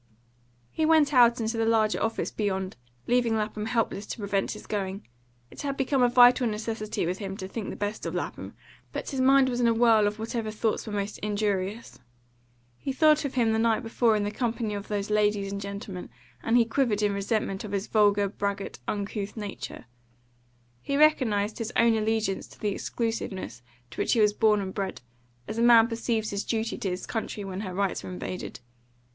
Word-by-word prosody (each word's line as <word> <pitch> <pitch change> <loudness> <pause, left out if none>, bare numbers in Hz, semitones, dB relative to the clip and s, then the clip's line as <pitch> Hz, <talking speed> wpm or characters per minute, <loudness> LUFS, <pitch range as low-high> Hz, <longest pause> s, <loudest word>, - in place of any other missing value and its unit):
He 315 - -1
went 310 -2 +4
out 240 -2 +6
into 225 +1 -1
the 225 - +1
larger 220 -1 +2
office 225 0 -1
beyond, 190 -3 -2 0.3
leaving 240 -2 +2
Lapham 215 0 -2
helpless 225 -3 -1
to - - -5
prevent 200 -2 -1
his 210 - -10
going. 195 -1 -4 0.4
It - - -9
had 275 -1 -3
become 270 0 +1
a 245 - +5
vital 245 +1 +6
necessity 215 -2 -3
with 180 +2 -2
him 195 -2 -5
to 190 -3 -6
think 210 +1 -5
the - - -5
best 205 +1 -3
of - - -4
Lapham, - - -5 0.4
but - - -4
his 265 -2 -1
mind 270 0 +5
was 245 -1 -1
in 240 - +3
a 230 - +3
whirl 225 -3 +5
of 210 +1 -3
whatever 225 0 -3
thoughts 215 +1 -1
were - - -4
most 205 0 -3
injurious. 205 0 -2 0.8
He 275 - -3
thought 305 +2 +4
of 270 - -4
him 230 -3 +3
the 220 - +1
night 230 +1 +2
before 225 0 +2
in 210 - 0
the 205 - -2
company 230 -1 -2
of 200 0 -5
those 205 0 -3
ladies 210 -2 +1
and 200 0 -4
gentlemen, 200 -2 -6 0.3
and 230 +2 +2
he 235 - +5
quivered 225 -3 0
in 205 -1 +2
resentment 200 -1 -1
of 210 - -7
his 200 0 -1
vulgar, 205 -2 +3
braggart, 200 0 -4
uncouth 205 0 -3
nature. 205 - -6 1.0
He 280 - -1
recognised 230 -9 +3
his 230 +1 -3
own 230 -1 +4
allegiance 220 -2 -1
to - - -17
the 210 - 0
exclusiveness 200 - -4 0.3
to - - -4
which - - +2
he 235 - +2
was 210 -1 +4
born 210 -1 +3
and 190 -1 -5
bred, 195 -8 -4 0.5
as 220 - -4
a - - +2
man 235 -1 +7
perceives 230 -1 -2
his 200 0 -2
duty 225 0 -2
to 195 - -2
his 180 0 -4
country 220 -2 -4
when 190 -1 -5
her 190 -3 -5
rights 200 0 -1
are - - -7
invaded. 180 -6 -6
215 Hz, 200 wpm, -27 LUFS, 200-235 Hz, 1.0 s, man